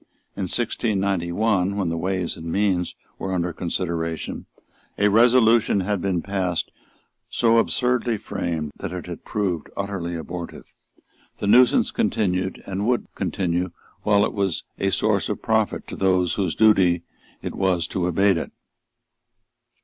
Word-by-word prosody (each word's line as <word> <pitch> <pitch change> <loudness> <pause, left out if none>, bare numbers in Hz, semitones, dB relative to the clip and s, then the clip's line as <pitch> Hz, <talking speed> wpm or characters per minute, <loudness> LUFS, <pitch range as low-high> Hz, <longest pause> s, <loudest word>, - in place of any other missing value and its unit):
In 100 - -2
1691, 100 -2 0
when 95 -4 0
the 85 - -1
Ways 90 +1 -1
and 80 0 -6
Means 95 -3 +1 0.2
were 95 - -3
under 90 -1 -1
consideration, 85 -2 -3 0.5
a 105 0 +4
resolution 115 -1 +5
had 100 0 -1
been 90 -3 0
passed 95 -3 -1 0.6
so 115 -1 +3
absurdly 125 -1 +1
framed 80 -6 -3
that - - -5
it 90 - -5
had 85 -1 -8
proved 95 -7 -2
utterly 95 -4 -3
abortive. 85 +1 -6 0.7
The - - -4
nuisance 125 +5 +5
continued, 95 -2 0
and 100 +2 -2
would 125 -1 0
continue 90 0 -1 0.3
while 105 -1 +4
it - - -3
was 100 -5 -1 0.2
a - - +1
source - - +1
of - - -4
profit 110 -1 0
to - - -5
those 90 -2 +2
whose 95 -5 -1
duty 95 -6 +4 0.4
was 90 -3 0
to 90 -2 -1
abate 95 +1 +3
it. 80 - -4
95 Hz, 135 wpm, -23 LUFS, 85-105 Hz, 0.7 s, resolution